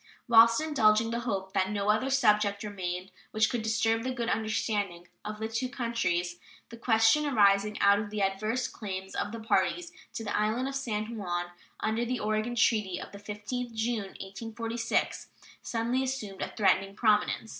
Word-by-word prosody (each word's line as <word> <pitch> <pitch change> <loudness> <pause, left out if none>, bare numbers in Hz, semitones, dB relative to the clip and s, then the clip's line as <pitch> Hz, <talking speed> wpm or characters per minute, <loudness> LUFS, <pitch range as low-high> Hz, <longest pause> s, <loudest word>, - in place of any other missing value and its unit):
Whilst 230 0 +7
indulging 225 -8 +3
the 235 - -1
hope 190 -2 -3
that 190 0 +1
no 205 0 -1
other 220 +5 0
subject 210 -6 +3
remained 185 -3 -4 0.2
which 220 0 +2
could 240 -3 -1
disturb 225 +1 +1
the 255 - -3
good 240 -2 -2
understanding 205 -5 -1 0.2
between 215 +1 -4
the 225 - -13
two 255 +3 -1
countries, 205 -9 -1 0.3
the 235 - -10
question 225 +5 +4
arising 205 -4 +3
out 200 0 +5
of 210 -1 -4
the 210 -1 -1
adverse 215 +6 -1
claims 190 -3 -6
of 205 - -2
the 230 - -6
parties 335 +9 0 0.2
to 225 - -4
the 205 - -2
island 220 +5 0
of 275 - -4
San 230 -4 -3
Juan, 175 -3 -3 0.3
under 220 +2 0
the 245 0 -2
Oregon 215 +3 -1
treaty 210 -5 +2
of - - -8
the 200 - -10
15th 215 +4 -5
June, 220 -3 -2
1846, 225 +3 -3 0.3
suddenly 235 +3 -1
assumed 255 -8 -4
a - - -3
threatening 195 -1 +2
prominence. 215 0 +2
220 Hz, 170 wpm, -29 LUFS, 200-235 Hz, 0.3 s, Whilst